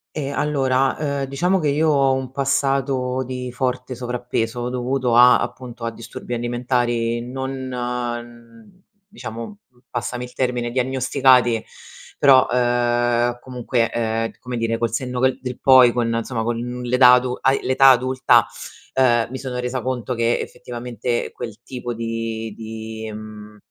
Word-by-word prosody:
Ehm, 140 -2 -3
allora, 135 -3 +1
uhm, 140 -2 -1
diciamo 175 +8 0
che 155 - 0
io 150 +3 +2
ho 135 -2 +3
un 130 -1 -3
passato 135 -1 0
di 125 0 -5
forte 125 +1 -2
sovrappeso, 120 -1 -3
dovuto 125 0 -1
a, 125 +1 +7
appunto, 120 -2 -6
a 115 - -2
disturbi 115 +1 -8
alimentari 120 -1 -1
non 130 +1 -5 1.4
diciamo, 125 - -8 0.3
passami 120 0 -4
il 125 - -9
termine, 125 -2 -1
diagnosticati, 130 -2 +3 0.5
però, 135 -2 +6
uhm, 120 0 +1
comunque, 125 -2 -1
ehm, 115 -1 -1
come 125 -1 -5
dire, 115 0 -1
col 115 -1 0
senno 125 +1 -2
che 130 0 +2
del 125 -1 -6
poi, 130 -2 +7
con, 120 -1 0
insomma, 115 0 -2
con 120 0 -1
n 125 +1 -5
l'età 125 -1 +7
adu 125 0 +2
hai 135 +1 +3
l'età 135 +1 +5
adulta, 130 -2 +4 0.5
uhm, 120 -3 +3
mi 130 - -5
sono 125 -1 -5
resa 125 0 -2
conto 125 -1 -2
che, 115 +1 +1
effettivamente, 120 -1 -4
quel 115 -2 -8
tipo 125 -2 -5
di 115 -1 -4
di, 110 0 -7
mhmm, 105 0 -10
125 Hz, 140 wpm, -21 LUFS, 120-130 Hz, 1.4 s, a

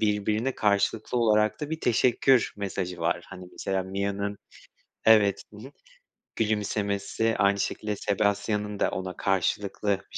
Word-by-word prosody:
birbirine 110 +4 0
karşılıklı 105 +3 +1
olarak 110 -2 +2
da 150 0 -4
bir 160 0 -3
teşekkür 125 +1 +3
mesajı 90 -3 -4
var, 85 +1 0
hani, 90 - -9
mesela 95 -1 -2
Mia'nın 100 +2 -3 0.7
evet, 105 -3 +5
hı - - -11
hı 140 - -13 0.7
gülümsemesi 105 0 0
aynı 100 0 +3
şekilde 105 +1 -2
Sebastian'ın 105 +1 -1
da - - +1
ona 95 0 -5
karşılıklı 100 +2 0 0.2
bir - - -4
105 Hz, 130 wpm, -27 LUFS, 100-110 Hz, 0.7 s, evet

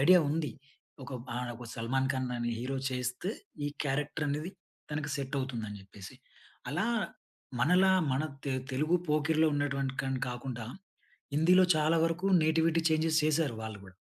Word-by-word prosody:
Idea 180 +6 +8
ఉంది. 155 -1 0 0.5
ఒక 140 - -10 0.3
ఆహ్, 125 0 -2
ఒక 120 0 -9
'సల్మాన్ 130 +3 0
ఖాన్' 130 -1 -2
అనే 120 0 -1
హీరో 135 +2 -2
చేస్తే 125 - -2 0.4
ఈ - - +1 0.2
క్యారెక్టర్ 150 +2 -1
అనేది, 150 +5 -2 0.4
తనకి 150 -1 -2
సెట్ 140 0 -3
అవుతుందని 110 -6 -4
చెప్పేసి. 95 0 -11 0.5
అలా 175 +9 0 0.7
మనలా 180 +5 +5 0.2
మన 135 +4 +1 0.2
తె 135 - 0 0.2
తెలుగు 155 +6 +1
'పోకిరి'లో 155 +1 +3
ఉన్నటువంటి 140 -2 -1
కన్ 135 -1 -1
కాకుండా, 120 -2 -5 0.7
హిందీలో 180 +4 +6
చాలా 155 +2 +3
వరకు 165 +3 -1 0.2
నేటివిటీ 160 +1 +3
చేంజెస్ 160 0 +3
చేసారు, 155 -5 +2
వాళ్ళు 110 -2 -6
కూడా... 95 - -13
145 Hz, 145 wpm, -31 LUFS, 130-160 Hz, 0.7 s, Idea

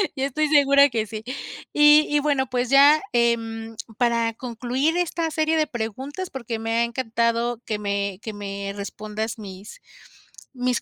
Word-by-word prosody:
Yo 270 -1 -1
estoy 305 +3 0
segura 280 -1 +5
que 225 -3 -1
sí. 215 0 -7 0.5
Y 295 +1 +6
y 295 - +2
bueno, 280 -3 0
pues, 250 -1 -1
ya, 285 +3 +6
em, 225 -1 0 0.2
para 235 -2 +1
concluir 250 +6 -2
esta 335 -2 -1
serie 315 0 +1
de 310 -1 +2
preguntas, 265 - -5
porque 235 -4 -5
me 225 0 -3
ha 235 - +3
encantado 235 0 -1
que 215 - -2
me 200 -2 -2
que 220 - -6
me 200 -1 -5
respondas 215 +2 -5
mis 205 - -10 0.7
mis 250 -1 -1
235 Hz, 155 wpm, -23 LUFS, 220-280 Hz, 0.7 s, Y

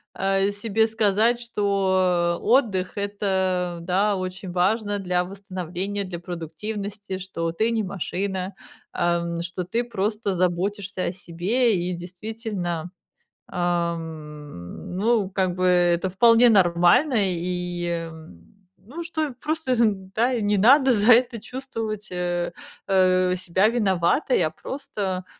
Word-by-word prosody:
а, 195 +1 +1
себе 220 +2 +1
сказать, 220 +2 +2
что 190 -5 +1
отдых- 210 -8 +2
это, 190 -3 -1
да, 195 +4 +1
очень 185 0 -5
важно 205 +3 +1
для 180 -1 0
восстановления, 195 +1 -4
для 175 -2 -6
продуктивности, 195 +4 -6
что 165 -3 -3
ты 220 +7 0
не 225 -1 +1
машина, 190 0 -3 0.4
ам, 170 -1 0
что 175 +1 -4
ты 230 +6 -1
просто 210 -3 -2
заботишься 185 +2 -1
о - - -1
себе. 190 +7 0
И 180 +1 -2
действительно, 180 -2 -5 0.6
ам, 160 - -4
ну, 215 -1 +2
как 185 -2 0
бы, 185 0 +1
это 175 0 +3
вполне 230 +4 +6
нормально. 190 - +4
И, 175 0 -2 0.2
м, 160 - -15
ну, 280 - -8
что 310 -5 -3
просто, 310 -4 -1
з 235 -1 +3 0.3
да, 240 +1 +1
не 205 0 +1
надо 265 +6 +6
за 215 +3 +6
это 240 0 +3
чувствовать, 225 -5 -5
э 175 -1 -2 0.4
э, 185 -1 +3
себя 185 +3 +2
виноватой, 205 - +2
а 155 - +1
просто, 190 - -4
190 Hz, 120 wpm, -24 LUFS, 175-215 Hz, 0.6 s, вполне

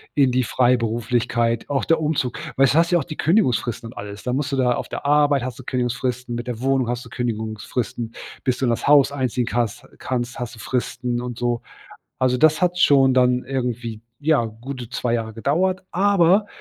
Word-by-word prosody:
in 140 -3 +4
die 130 +1 +2
Freiberuflichkeit, 120 -1 +1
auch 140 -1 0
der 165 - +3
Umzug, 150 -5 -1 0.2
weil 135 - +6
s - - +3
du - - +2
hast 170 +1 +3
ja 175 - +4
auch - - -2
die 155 - -8
Kündigungsfristen 125 - +1
und - - -17
alles. 100 0 -7
Da 125 - -2
musst 140 +1 -1
du - - 0
da 125 -2 +3
auf - - -4
der - - -6
Arbeit 145 -2 +3
hast 130 +1 -5
du - - -9
Kündigungsfristen, 125 0 -2
mit 120 +1 -5
der 120 -1 -4
Wohnung 135 -2 +1
hast 120 0 -2
du - - -12
Kündigungsfristen. 115 0 -3 0.3
Bis 125 -1 0
du 135 - 0
in - - +2
das 115 - -2
Haus 145 -1 +6
einziehen 130 -3 -1
kannst 120 -3 -2
kannst, 120 -2 -3
hast 120 -1 -5
du - - -15
Fristen 125 0 -2
und 125 -1 -6
so. 120 -1 -1 0.6
Also, 125 -1 +2
das 155 +4 +4
hat 180 0 +1
schon 135 -4 +5
dann 125 -1 +3
irgendwie, 120 -4 -3 0.2
ja, 150 -4 +2
gute 120 +2 -8
2 120 -1 -1
Jahre 110 -1 -2
gedauert. 180 +11 0
Aber 195 +1 +3
125 Hz, 205 wpm, -22 LUFS, 120-140 Hz, 0.6 s, weil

